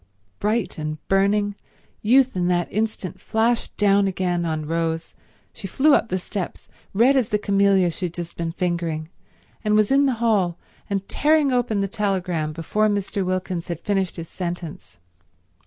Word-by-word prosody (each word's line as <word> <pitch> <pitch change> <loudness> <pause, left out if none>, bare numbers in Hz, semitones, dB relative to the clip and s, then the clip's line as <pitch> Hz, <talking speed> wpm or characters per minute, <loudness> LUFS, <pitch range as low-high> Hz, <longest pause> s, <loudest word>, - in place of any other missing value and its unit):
Bright 210 -4 -1
and 155 0 -3
burning, 205 +1 +2 0.5
Youth 255 +3 +4
in 175 -1 +1
that 175 -1 0
instant 215 -3 -2
flashed 225 +1 0
down 200 -1 +4
again 180 -2 -1
on 155 -2 -2
Rose. 165 0 -2 0.4
She 195 - -7
flew 285 +9 +3
up 230 - +3
the 185 - 0
steps, 185 0 -5 0.2
red 240 +7 +4
as 255 -5 +2
the 210 - +2
camellia 200 -3 +3
she 180 +2 -3
had 170 - -11
just 175 -1 -6
been 170 -1 -3
fingering, 170 -3 -2 0.5
and 210 -1 +2
was 215 +1 +3
in 280 +1 +5
the 265 - +2
hall 205 -7 +1 0.3
and 195 -1 -2
tearing 300 -2 +3
open 235 -5 +1
the 195 - 0
telegram 185 -6 -1
before 170 +7 0
Mr. 200 -1 -1
Wilkins 185 -1 -2
had 170 -3 -4
finished 195 -1 -1
his 165 -1 -6
sentence. 170 - -6
195 Hz, 165 wpm, -23 LUFS, 175-215 Hz, 0.5 s, in